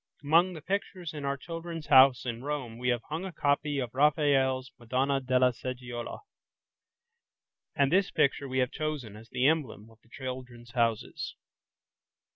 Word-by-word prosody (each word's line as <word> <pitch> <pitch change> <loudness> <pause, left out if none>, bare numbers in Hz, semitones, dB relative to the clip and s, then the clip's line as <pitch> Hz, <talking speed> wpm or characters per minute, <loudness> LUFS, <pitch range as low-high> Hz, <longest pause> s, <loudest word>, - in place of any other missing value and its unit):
Among 170 +5 +4
the 155 -3 -9
pictures 185 -3 -3
in 145 -2 -5
our 140 0 -1
"Children's 165 +2 -6
House" 130 -2 +6
in 120 0 -4
Rome 135 -6 -4
we 125 0 0
have 120 -2 0
hung 160 +4 -3
a 190 - -5
copy 145 -1 0
of 125 -4 -3
Raphael's 135 -2 +2
"Madonna 130 +4 0
della 130 -1 +3
Seggiola", 125 -1 -6 1.5
and 140 -2 +3
this 190 +2 +3
picture 140 0 +1
we 130 - -2
have 125 -1 +2
chosen 150 -9 -4
as 110 +1 -13
the 125 - 0
emblem 130 -8 0
of 115 - -21
the 115 - -27
"Children's 125 -2 -7
Houses". 115 -3 -1
130 Hz, 155 wpm, -29 LUFS, 125-150 Hz, 1.5 s, House